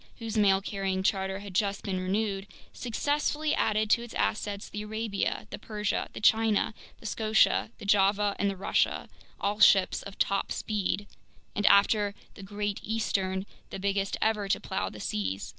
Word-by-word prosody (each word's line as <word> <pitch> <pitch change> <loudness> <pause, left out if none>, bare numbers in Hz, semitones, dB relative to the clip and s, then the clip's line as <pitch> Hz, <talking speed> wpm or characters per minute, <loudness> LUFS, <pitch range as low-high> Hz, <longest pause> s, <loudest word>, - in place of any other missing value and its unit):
whose 225 -1 -5
mail 195 -2 +4
carrying 195 -2 -2
charter 190 0 0
had 200 -2 -9
just 200 +1 0
been 190 -2 -2
renewed, 195 +1 -1 0.3
successively 295 +5 -1
added 215 0 +1
to 235 - +3
its 235 -1 -9
assets 205 -1 -1
the 210 - -6
Arabia, 215 -1 -2
the - - -6
Persia, 210 -1 -2
the - - -6
China, 220 -1 +3 0.3
the - - -15
Scotia, 220 0 +2
the - - -10
Java, 200 0 +3
and 200 - +2
the 195 - -4
Russia, 190 - 0 0.3
all 205 +1 -1
ships 195 -2 +5
of 200 - -10
top 195 0 0
speed 205 -1 -1 0.5
and, 205 - +2
after 200 0 +4 0.2
the - - -12
Great 205 +1 -3
Eastern, 195 -3 -1 0.2
the - - -6
biggest 195 0 -1
ever 215 -2 +1
to 195 - +1
plow 190 - -3
the 105 - -11
seas. 100 -2 -3
205 Hz, 165 wpm, -29 LUFS, 195-215 Hz, 0.5 s, ships